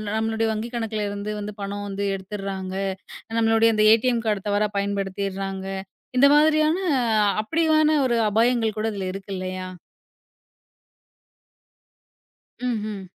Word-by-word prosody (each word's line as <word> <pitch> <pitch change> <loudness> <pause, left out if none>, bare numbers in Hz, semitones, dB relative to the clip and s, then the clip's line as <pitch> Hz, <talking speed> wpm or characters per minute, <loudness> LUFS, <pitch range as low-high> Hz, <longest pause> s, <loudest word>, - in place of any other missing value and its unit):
நம்மளுடைய 225 0 0
வங்கி 220 +2 -3
கணக்குல 220 -3 -2
இருந்து 205 +1 -4
வந்து 210 0 -5
பணம் 200 +1 -4
வந்து 200 0 -4
எடுத்துறாங்க. 190 -1 -5 0.6
நம்மளுடைய 225 0 +4
அந்த 215 - +3
ஏடிஎம் 235 +1 +1
கார்டு 210 -2 -1
தவறாப் 205 0 0
பயன்படுத்திறாங்க. 195 -1 -3 0.5
இந்த 275 +3 +7
மாதிரியான 310 +2 +4 0.6
அப்படியான 310 +4 +2
ஒரு 240 -2 +1
அபாயங்கள் 225 0 +2
கூட 215 +1 -1
இதுல 195 -2 -4
இருக்குல்லையா? 185 -1 -5 3.0
ம்ஹம். 215 -5 -3
210 Hz, 105 wpm, -24 LUFS, 195-230 Hz, 3.0 s, இந்த